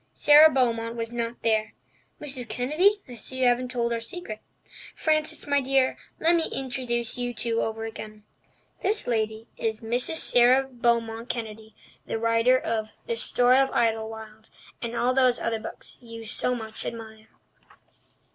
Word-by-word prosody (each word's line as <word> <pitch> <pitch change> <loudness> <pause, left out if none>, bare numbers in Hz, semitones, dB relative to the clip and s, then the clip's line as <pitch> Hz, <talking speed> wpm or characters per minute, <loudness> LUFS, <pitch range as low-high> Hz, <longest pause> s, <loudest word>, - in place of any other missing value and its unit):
Sara 300 +2 +7
Beaumont 230 -4 +1
was 230 0 -4
not 235 0 -4
there. 220 -1 0 0.4
Mrs. 265 -5 -3
Kennedy, 355 +11 +2
I 250 - -10
see 245 +3 -7
you - - +4
haven't 245 +1 +2
told 235 -1 -1
our 230 - -1
secret. 230 -3 -7 0.6
Frances, 310 -1 0
my 285 -1 +2
dear, 265 0 +2 0.2
let 330 +2 +4
me 330 - +2
introduce 245 -2 -2
you 245 -1 -2
two 230 0 +1
over 225 0 -3
again. 215 -1 -9 0.6
This 410 +3 0
lady 220 -1 -2
is 220 -1 -2
Mrs. 245 +7 -1
Sara 255 -2 +4
Beaumont 235 -2 -1
Kennedy, 220 -2 -6 0.3
the - - -2
writer 230 +3 +3
of 220 -3 -2 0.2
The 230 - -2
Story 245 +2 +3
of 270 0 +3
Idlewild 220 -1 -2 0.3
and 235 0 -4
all 245 +2 +2
those 255 -2 +4
other 225 -1 -1
books - - -9
you 230 -1 -10
so 250 +3 0
much 220 -2 -6
admire." 220 -1 -8
235 Hz, 155 wpm, -26 LUFS, 225-255 Hz, 0.6 s, Sara